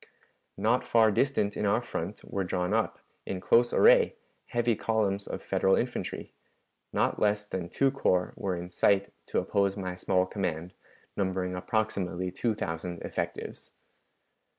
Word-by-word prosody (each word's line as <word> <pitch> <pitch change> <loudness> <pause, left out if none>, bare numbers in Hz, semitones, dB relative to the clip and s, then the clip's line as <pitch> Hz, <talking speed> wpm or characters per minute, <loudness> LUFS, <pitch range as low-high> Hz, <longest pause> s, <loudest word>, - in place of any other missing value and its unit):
"Not 120 +4 +2
far 110 -2 +4
distant 105 -3 +1
in 105 - 0
our 115 +4 +2
front 100 -3 -5
were 100 - -3
drawn 90 +1 -1
up, 110 0 0 0.3
in 95 - -3
close 120 +5 +4
array, 480 +1 +5 0.3
heavy 120 -1 +1
columns 100 -3 0
of - - -5
Federal 95 - +2
infantry; - - -3 0.6
not - - 0
leas 105 0 +2
than 95 -4 -4
two 135 -1 +2
corps 90 -9 +1
were 95 -2 -2
in 90 +1 -7
sight 100 +2 +2
to - - -2
oppose 100 0 +1
my 95 -2 -3
small 90 0 +1
command, 90 -3 -3 0.4
numbering 95 -2 -1
approximately 95 -3 -1
two 110 +4 -1
thousand 85 -1 -4
effectives. - - -5
100 Hz, 145 wpm, -29 LUFS, 90-110 Hz, 0.6 s, array